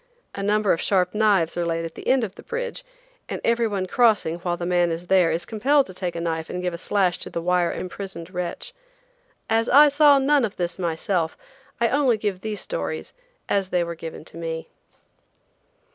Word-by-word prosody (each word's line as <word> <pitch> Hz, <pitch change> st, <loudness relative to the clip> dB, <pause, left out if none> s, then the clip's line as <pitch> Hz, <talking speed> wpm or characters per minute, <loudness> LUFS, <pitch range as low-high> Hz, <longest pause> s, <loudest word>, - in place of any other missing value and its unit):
A 200 Hz, -, -5 dB
number 210 Hz, 0 st, +2 dB
of 165 Hz, -, -2 dB
sharp 180 Hz, -2 st, +1 dB
knives 205 Hz, -6 st, +2 dB
are 175 Hz, -, 0 dB
laid 165 Hz, 0 st, -1 dB
at 165 Hz, -, -7 dB
the -, -, -10 dB
end 260 Hz, -1 st, +3 dB
of 200 Hz, -4 st, -4 dB
the -, -, -12 dB
bridge, 485 Hz, +1 st, -5 dB, 0.5 s
and -, -, -3 dB
every 235 Hz, 0 st, +2 dB
one 200 Hz, -3 st, -2 dB
crossing 205 Hz, -6 st, +2 dB
while 175 Hz, 0 st, -2 dB
the 175 Hz, -, -4 dB
man 175 Hz, -1 st, +2 dB
is 165 Hz, +2 st, -4 dB
there 185 Hz, -2 st, +4 dB
is 170 Hz, -, -2 dB
compelled 270 Hz, +6 st, +2 dB
to 185 Hz, -, -11 dB
take 180 Hz, -2 st, -4 dB
a -, -, -3 dB
knife 160 Hz, -1 st, -3 dB
and 180 Hz, -, -4 dB
give 180 Hz, -1 st, -1 dB
a -, -, -4 dB
slash 185 Hz, -2 st, +1 dB
to -, -, -7 dB
the -, -, -3 dB
wire 175 Hz, 0 st, +1 dB
imprisoned 185 Hz, -2 st, -7 dB
wretch. 180 Hz, -, -5 dB, 0.7 s
As 225 Hz, +1 st, +1 dB
I 290 Hz, +3 st, +8 dB
saw 285 Hz, 0 st, +6 dB
none 275 Hz, 0 st, +3 dB
of 210 Hz, -3 st, -2 dB
this 175 Hz, +1 st, -3 dB
myself, 170 Hz, 0 st, -1 dB, 0.4 s
I 235 Hz, -, +3 dB
only 265 Hz, -4 st, +3 dB
give 205 Hz, -3 st, -3 dB
these 210 Hz, -2 st, -4 dB
stories 80 Hz, -1 st, -4 dB, 0.3 s
as 195 Hz, -2 st, 0 dB
they 180 Hz, -2 st, +1 dB
were 170 Hz, 0 st, -4 dB
given 165 Hz, -1 st, -8 dB
to -, -, -12 dB
me. 165 Hz, -1 st, -5 dB
185 Hz, 205 wpm, -24 LUFS, 170-220 Hz, 0.7 s, I